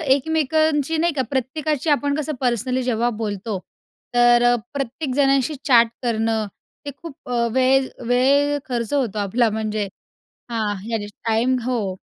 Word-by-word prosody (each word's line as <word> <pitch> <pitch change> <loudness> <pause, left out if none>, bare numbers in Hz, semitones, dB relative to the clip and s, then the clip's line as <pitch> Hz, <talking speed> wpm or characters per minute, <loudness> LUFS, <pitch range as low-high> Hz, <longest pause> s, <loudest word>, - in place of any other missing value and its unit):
एकमेकांची 315 +1 +1
नाही 335 +1 +1
का 280 - 0
प्रत्येकाची 290 +3 -1
आपण 285 -1 +2
कसं 305 0 -2
पर्सनली 255 +1 0
जेव्हा 240 -1 +1
बोलतो, 205 -1 -3 0.5
तर 240 0 +5
अ, 245 0 +5 0.2
प्रत्येक 275 0 -3
जणाशी 275 0 +2
चॅट 235 -4 +6 0.2
करणं, 225 -2 0 0.4
ते 285 - -4
खूप 330 -5 -8
अ, 235 -1 +1
वेळ 260 +1 +3 0.2
वेळ 280 +4 +3
खर्च 235 0 -2
होतो 250 -8 0
आपला, 220 +4 +1
म्हणजे 215 -1 -2 0.6
हां, 220 -3 -1 0.2
या 225 - 0 0.3
टाइम 235 +4 +2
हो, 220 -7 -1
255 Hz, 140 wpm, -21 LUFS, 230-285 Hz, 0.6 s, चॅट